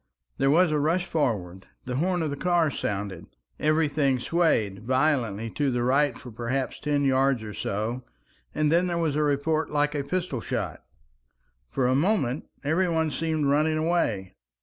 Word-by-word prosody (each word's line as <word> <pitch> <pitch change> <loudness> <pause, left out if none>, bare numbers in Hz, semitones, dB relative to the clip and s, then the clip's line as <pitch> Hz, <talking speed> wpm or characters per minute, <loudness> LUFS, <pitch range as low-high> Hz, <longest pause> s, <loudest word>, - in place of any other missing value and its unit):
There 135 - +3
was 170 +3 +4
a 150 - +1
rush 165 +5 +1
forward, 95 - -2 0.2
the 125 0 -3
horn 175 +2 +1
of 155 - -2
the - - -2
car 170 0 +2
sounded, 100 -6 -4 0.3
everything 150 -3 +2
swayed 120 - +1
violently 120 -3 0
to 145 -2 0
the 120 -2 0
right 135 0 +2
for 125 - -10
perhaps 120 +4 -3
ten 145 -1 0
yards 135 -3 +2
or 105 -1 -7
so, 110 +7 -3 0.5
and 150 0 +2
there 175 +1 +2
was 160 -4 0
a 150 - +1
report 150 +2 +1
like 150 0 +1
a 145 -2 -1
pistol 170 -5 -2
shot. - - -4 0.9
For 130 - 0
a 125 - +3
moment 145 - +1 0.2
every 170 +5 +1
one 160 -2 +1
seemed 160 -1 -1
running 155 +3 +2
away. 135 - 0
145 Hz, 165 wpm, -26 LUFS, 125-160 Hz, 0.9 s, was